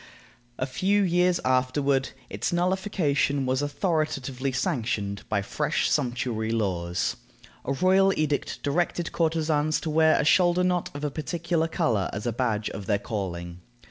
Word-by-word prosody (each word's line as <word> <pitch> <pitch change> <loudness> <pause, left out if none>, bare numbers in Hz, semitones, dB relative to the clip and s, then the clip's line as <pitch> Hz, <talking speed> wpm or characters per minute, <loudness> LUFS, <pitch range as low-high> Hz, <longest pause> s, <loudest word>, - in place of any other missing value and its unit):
A 130 - -1
few 195 +10 +1
years 180 0 +2
afterward, 130 +1 +1 0.2
its - - -3
nullification 175 -6 +1
was 130 +1 0
authoritatively 145 -4 -1
sanctioned 115 - -1
by 100 -2 0
fresh - - -1
sumptuary 120 -4 -1
laws. 90 -6 -1 0.5
A 135 - 0
royal 190 +5 +4
edict 150 -2 -1
directed 170 +3 0
courtesans 155 -2 +1
to 160 - -3
wear 160 0 +4
a - - +1
shoulder 175 +2 +4
knot 180 -1 0
of 145 - -6
a 150 - -1
particular 165 +2 -1
color 110 - 0
as 105 +1 -5
a 120 - 0
badge 110 -3 -1
of 100 -2 -7
their 105 - +2
calling. 90 -5 -5
145 Hz, 140 wpm, -26 LUFS, 115-170 Hz, 0.5 s, royal